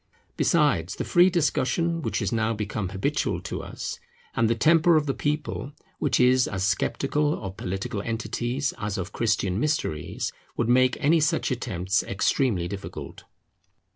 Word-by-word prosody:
Besides, 145 - +2
the - - -3
free 175 +1 +5
discussion 165 0 +1
which - - -2
has 100 -5 -1
now 110 0 +1
become 105 -2 -3
habitual 95 0 -1
to - - -5
us, - - -6 0.4
and 115 -1 +2
the 115 - +2
temper 165 +7 +5
of 155 -1 +3
the 135 - 0
people, 150 -1 -3 0.3
which - - +1
is 125 0 +5
as 95 -2 -3
sceptical 140 +9 0
of 95 -2 -6
political 100 +4 -3
entities 120 +4 -2
as 105 0 -3
of 95 +1 -4
Christian 105 -4 0
mysteries, 120 - -2 0.2
would 115 - 0
make 130 +1 +4
any 160 +3 +4
such 150 -2 +1
attempts 95 -6 0
extremely 100 -2 0
difficult. 100 +1 -8
120 Hz, 150 wpm, -26 LUFS, 100-145 Hz, 0.4 s, free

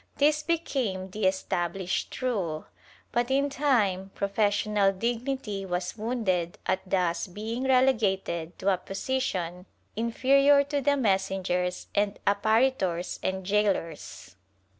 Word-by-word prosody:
^ - - -30
This 300 +1 +3
became 255 - -2
the 205 -1 +1
established 185 +3 -2
rule, 185 -11 -1 0.5
but 240 +1 0
in 275 +1 +2
time 210 -10 +1
professional 205 0 +2
dignity 235 0 -2
was 180 -1 -3
wounded 210 -7 -1
at 190 - +1
thus 180 -2 +1
being 220 +7 -4
relegated 205 -10 +1
to 195 +1 +2
a - - 0
position 190 -6 -3 0.3
inferior 275 +5 +4
to 285 0 -2
the 285 +1 +2
messengers 190 -5 0
and 205 0 +1
apparitors 205 -4 +1
and 190 0 -2
gaolers. 195 - -1
205 Hz, 115 wpm, -27 LUFS, 185-255 Hz, 0.5 s, inferior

